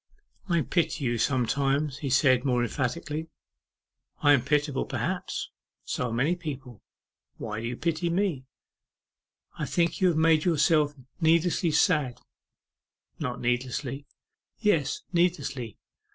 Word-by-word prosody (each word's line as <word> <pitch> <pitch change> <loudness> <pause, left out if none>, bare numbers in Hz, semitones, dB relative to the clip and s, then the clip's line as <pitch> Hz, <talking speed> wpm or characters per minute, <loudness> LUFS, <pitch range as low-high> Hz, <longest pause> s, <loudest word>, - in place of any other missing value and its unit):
'I 170 -2 +3
pity 160 -4 0
you 120 -1 0
sometimes,' 135 +3 +1
he 140 - -3
said 130 -1 +4
more 125 -3 +1
emphatically. 145 +6 -3 1.0
'I 145 -1 +7
am 140 - +4
pitiable, 145 +1 0
perhaps; - - -3 0.3
so 125 - -2
are - - -4
many 135 +9 +1
people. 135 - -7 0.6
Why 110 0 -5
do 115 - -3
you 120 +1 -4
pity 170 +1 -1
me?' 170 -7 -1 1.1
'I - - -1
think 170 -1 +2
that - - -9
you 180 -3 +4
make 160 -1 +4
yourself 150 -3 +3 0.2
needlessly 165 +1 +3
sad.' 150 -5 +2 1.0
'Not 125 -1 -3
needlessly.' 125 +3 -2 0.5
'Yes, 205 - +1
needlessly. 150 - 0
145 Hz, 125 wpm, -27 LUFS, 125-165 Hz, 1.1 s, I